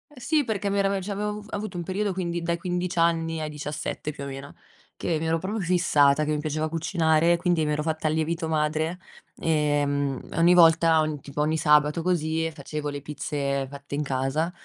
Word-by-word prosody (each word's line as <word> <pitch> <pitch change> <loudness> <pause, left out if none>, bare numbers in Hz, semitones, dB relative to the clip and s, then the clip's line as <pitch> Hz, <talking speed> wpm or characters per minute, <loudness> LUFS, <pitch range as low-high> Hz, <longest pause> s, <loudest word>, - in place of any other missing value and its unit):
sì, 295 +4 +1
perché 205 -3 -2
mi 200 - +1
era 195 0 +1
cioè, 200 +2 -5
avevo 210 +1 -2
avu 205 - -15
avuto 205 -3 -4
un 170 - -3
periodo, 200 +3 -1
quindi 175 -2 -3
dai 170 0 -1
15 180 +1 -3
anni 165 -1 +1
ai 155 -1 -3
17 150 0 -4
più 140 - -8
o - - -5
meno, 135 +1 -8 0.4
che 165 -3 -1
mi 160 - -2
ero 165 +1 +2
proprio 205 +6 -3
fissata 155 -5 +3
che 155 - -1
mi 150 - 0
piaceva 155 +1 -2
cucinare, 165 0 +2
quindi 175 -2 +1
mi 150 - 0
ero 150 0 -1
fatta 160 -1 -1
il 155 - +1
lievito 160 +1 -1
madre, 155 +2 0 0.4
ehm, 145 -3 0
ogni 170 +2 +5
volta 165 -1 +6
ogni 155 -1 -2
tipo 145 +1 -4
ogni 155 +2 +1
sabato 150 +1 +3
così 165 -2 0
facevo 150 0 -5
le 145 -1 -5
pizze 140 -2 -2
fatte 140 0 -10
in 145 - 0
casa, 140 +5 -1
160 Hz, 200 wpm, -25 LUFS, 150-175 Hz, 0.4 s, volta